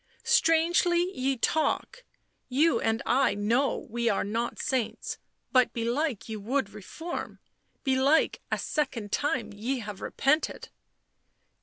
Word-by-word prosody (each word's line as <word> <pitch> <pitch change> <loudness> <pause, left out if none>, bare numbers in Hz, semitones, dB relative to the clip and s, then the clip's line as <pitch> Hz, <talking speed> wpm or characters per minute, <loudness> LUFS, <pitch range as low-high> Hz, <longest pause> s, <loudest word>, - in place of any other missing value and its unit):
" - - -45
Strangely 345 -4 +3
ye 265 0 0
talk 315 - 0 0.2
— - - -47
you 330 +2 +4
and 225 +1 0
I 265 -2 +3
know 230 +7 +1
we 235 +1 0
are 200 - +1
not 225 +4 -2
saints 230 -3 -2
— - - -50
but 255 -2 +4
belike 240 +2 -1
ye 220 -1 -4
would 220 +1 -1
reform 315 - -6 0.2
— - - -45
belike 270 +3 +3
a - - +2
second 250 -9 -2
time 245 -7 -1
ye 235 +7 -2
have 210 -4 -7
repented." 300 +4 0
260 Hz, 140 wpm, -28 LUFS, 225-310 Hz, 0.2 s, you